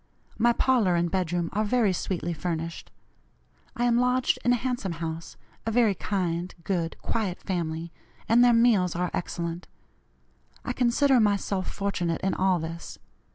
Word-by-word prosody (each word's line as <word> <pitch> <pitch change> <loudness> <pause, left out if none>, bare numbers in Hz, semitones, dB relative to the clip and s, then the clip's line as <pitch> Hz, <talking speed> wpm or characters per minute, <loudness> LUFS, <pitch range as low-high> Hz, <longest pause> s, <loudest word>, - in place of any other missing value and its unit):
My 240 +1 +5
parlor 235 -7 +2
and 170 0 0
bedroom 175 -2 -1
are 215 - +1
very 215 -2 +2
sweetly 175 -1 -2
furnished. 165 0 -4 0.9
I 240 - 0
am 240 0 +3
lodged 250 0 +2
in 245 - +3
a - - +5
handsome 245 -7 -2
house, 165 0 -6 0.3
a - - -2
very 225 -2 +3
kind, 180 -2 -2
good, 170 -4 -2
quiet 205 -6 -2
family, 170 -3 -3 0.4
and 235 +2 +5
their 245 - +6
meals 230 -7 +3
are 180 0 -1
excellent. 170 0 -4 1.0
I - - -1
consider 255 +2 +3
myself 200 -3 0
fortunate 180 -5 -2
in 190 - 0
all 190 -1 +2
this. 165 +1 -6
190 Hz, 150 wpm, -27 LUFS, 170-235 Hz, 1.0 s, their